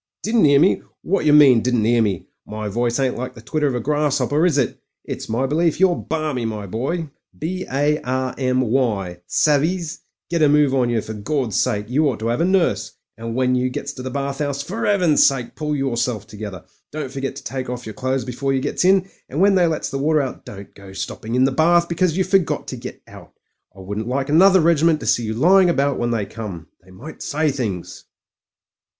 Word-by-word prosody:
"Didn't 220 -6 +3
'ear 140 -1 +5
me! 175 +6 +3 0.2
Wot 195 -2 0
yer 150 - +5
mean, 135 -6 +7
didn't 120 -3 +1
'ear 120 +1 +3
me? 100 -5 -1 0.2
My 105 0 -5
voice 120 +4 -1
ain't 130 -3 0
like 125 - -5
the 115 - -11
twitter 150 +4 0
of 130 - -1
a - - -1
grass'opper, 145 +2 +1
is 155 -5 +1
it? 135 - 0 0.3
It's - - -6
my 115 +4 0
belief 160 +4 +1
you're 185 -2 +4
balmy, 155 -7 -3
my 110 -2 -4
boy, 140 - -3 0.3
B 185 +4 -4
A 145 +3 +1
R 130 0 -2
M 130 -1 0
Y. 110 -8 -1
Savez. 155 - +1 0.3
Get 170 -1 -1
a 150 - +5
move 145 -2 +3
on 125 -3 +2
yer, 115 -2 0
for 110 - -6
Gawd's 115 0 -2
sake! 105 0 -1
You 145 +5 +2
ought 125 - -3
to 115 +1 0
'ave 120 +8 0
a - - +2
nurse. 110 - +1 0.2
And 115 0 -6
when 130 0 +1
you 125 0 +1
gets 140 +3 -5
<v) 130 - -9
the 130 - -5
bath 140 +1 -3
'ouse, 140 -1 -2
for 220 +8 -3
'Eaven's 180 -7 +4
sake 130 -4 +1
pull 150 0 -2
yerself 120 -5 -1
together! 105 -5 -8 0.3
Don't 150 -3 -5
forget 135 -1 -4
to 140 - -9
take 130 -2 -5
off 125 0 -5
yer 110 - -7
clothes 130 +2 -2
before 135 +2 -2
yer 135 - +1
gets - - -1
in; 190 0 +4 0.2
and 145 - -4
when 200 +2 +5
they 180 -2 +4
lets 160 -2 -2
the 135 - -3
water 150 +1 +2
out, 130 - -7
don't 100 -1 -10
go 100 -1 -13
stopping 110 +4 -5
in 130 - +3
the 135 - +3
bath 170 +5 +3
because 170 0 0
you 190 - +3
forgot 190 -1 0
to - - -5
get - - -9
out. - - -14 0.4
I - - -10
wouldn't 105 +4 -5
like 135 +2 -2
another 185 +4 +6
regiment 165 -1 +3
to - - -6
see 120 - +1
you 110 0 -3
lying 180 - +5
about 140 -4 +1
when 120 - 0
they 115 -4 -1
come. 100 -8 -8
They 90 - -21
might 120 +13 -11
say 155 0 0
things." 110 -10 -5
135 Hz, 225 wpm, -21 LUFS, 115-155 Hz, 0.4 s, mean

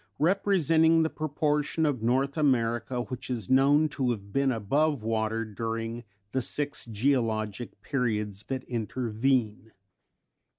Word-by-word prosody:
5), - - -47
representing 165 -2 +3
the 160 - -1
proportion 150 +1 0
of 140 -6 0
North 130 +4 +1
America 120 -4 +1
which 125 0 -7
is 115 -5 -3
known 140 +4 +5
to 135 -3 -1
have 100 -4 -4
been 135 -1 +2
above 135 +4 0
water 110 0 -1
during 115 +2 -4 0.3
the 130 - 0
six 145 +1 0
geologic 115 -2 -1
periods 105 -7 -1
that 130 -1 -3
intervene. 115 -1 -1
125 Hz, 125 wpm, -28 LUFS, 115-145 Hz, 0.3 s, known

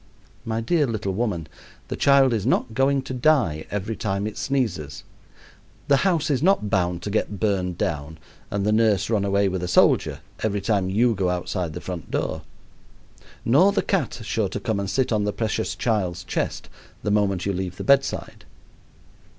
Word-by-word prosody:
My 115 0 -1
dear 145 +5 +2
little 110 -4 -2
woman, 95 -6 -1 0.4
the - - -4
child 140 -2 +4
is 110 -4 -1
not 115 -1 +1
going 135 +3 +2
to 130 - -6
die 125 - +2
every 105 +2 -3
time 100 -1 -2
it 105 -1 -4
sneezes, 110 - -2 0.9
the 140 - +6
house 165 -3 +1
is 135 - +1
not 170 - +2
bound 90 -2 0
to 100 - -3
get 105 -1 -1
burned 95 -5 0
down 80 -1 -3 0.3
and 100 -1 -2
the 105 - +2
nurse 110 -1 +2
run 105 -3 +2
away 100 0 +2
with 95 -1 -2
a 90 - -2
soldier 90 - +3 0.2
every 105 -2 0
time 100 -2 0
you 115 +5 +3
go 95 -3 0
outside 90 -2 -2
the - - -6
front 90 -5 -6
door; 80 - -2 1.0
nor 150 +12 +5
the 200 - 0
cat 170 -11 -1
sure 110 -2 -1
to - - -4
come 110 -4 -1
and 100 -1 -3
sit 130 +2 0
on 105 -2 +2
the 105 - 0
precious 105 -4 -2
child's 95 -4 -1
chest - - -3 0.4
the 105 - 0
moment 100 -3 +1
you 100 - 0
leave 90 -1 -4
the - - -5
bedside. 140 0 +1
105 Hz, 185 wpm, -24 LUFS, 95-120 Hz, 1.0 s, the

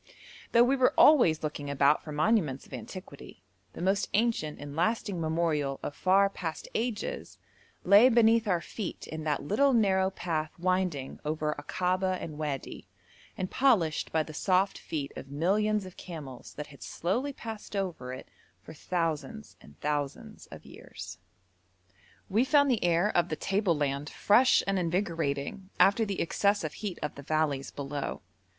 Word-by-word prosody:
Though 235 - +6
we 260 +3 +3
were 260 -2 +3
always 235 - +6
looking 150 -2 -4
about 140 +1 +3
for 155 - -8
monuments 150 - +1
of - - -16
antiquity, 155 - -9 0.3
the - - -6
most 195 +2 +1
ancient 215 -9 0
and 145 0 -8
lasting 185 +1 0
memorial 155 -4 0
of - - -4
far 195 +2 +4
past 170 -5 -6
ages 225 -2 -3 0.5
lay 205 +7 +7
beneath 230 -2 +4
our 180 -4 +1
feet 205 0 -6
in 160 0 -6
that 150 -2 0
little 260 - +3
narrow 190 -4 +3
path 160 -5 -3
winding 180 -6 -1
over 150 0 -1
Akaba 185 +5 0
and 155 -2 -7
Wadi, 145 -3 -4 0.5
and 185 - -3
polished 210 - +2
by 160 -1 +2
the 155 - -10
soft 185 +4 +1
feet 145 -3 -4
of 135 - -8
millions 200 +7 +1
of 185 - -11
camels 145 -8 -9
that 150 - -5
had 140 - -16
slowly 240 - -2
passed 225 -5 -8
over 175 -10 -3
it 130 - -8 0.4
for - - -11
thousands 155 - -3
and 75 +2 -17
thousands 145 -2 -3
of - - -12
years. - - -10 1.1
We 215 +5 +2
found 285 0 +4
the 235 - 0
air 175 +4 +2
of 175 0 +2
the 155 - -1
table 195 -1 0
land 145 0 -1
fresh 245 +5 +4
and 195 -1 0
invigorating 170 -1 -2
after 200 +3 +5
the 200 -2 -3
excessive 200 -2 +1
heat 205 -5 -5
of 150 - -2
the 140 - -10
valleys 145 -2 -1
below. 140 0 -5
175 Hz, 155 wpm, -29 LUFS, 150-205 Hz, 1.1 s, lay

